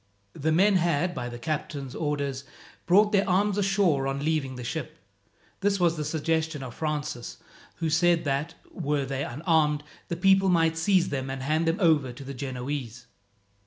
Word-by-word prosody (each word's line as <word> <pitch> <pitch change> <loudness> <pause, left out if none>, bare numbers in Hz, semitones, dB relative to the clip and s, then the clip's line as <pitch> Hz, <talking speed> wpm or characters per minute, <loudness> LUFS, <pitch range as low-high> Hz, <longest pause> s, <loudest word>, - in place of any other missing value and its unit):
The 155 +2 -1
men 190 +4 +4
had, 175 0 +1
by 120 -7 -4
the 120 - -7
captain's 145 -1 -4
orders, 140 -3 -2 0.4
brought 205 +4 +5
their 200 -2 +2
arms 200 +2 +2
ashore 190 -9 +2
on 140 +1 -2
leaving 150 -5 0
the 125 - -7
ship. 150 +2 -5 0.6
This 200 0 +1
was 170 -2 +3
the 155 - -3
suggestion 160 -1 -1
of 125 -2 -7
Francis, 150 -4 -4 0.4
who 165 -2 -2
said 170 +1 +3
that, 150 +3 -2 0.2
were 145 -1 -1
they 135 +1 -3
unarmed, 150 +1 +1 0.2
the 170 - -3
people 195 +1 +4
might 165 -2 +3
seize 180 +2 +2
them 135 -1 -3
and 135 0 -4
hand 155 +4 +1
them 165 +2 +2
over 155 -8 +3
to 130 - -10
the 135 +1 -7
Genoese. 125 -2 -5
155 Hz, 170 wpm, -27 LUFS, 135-170 Hz, 0.6 s, brought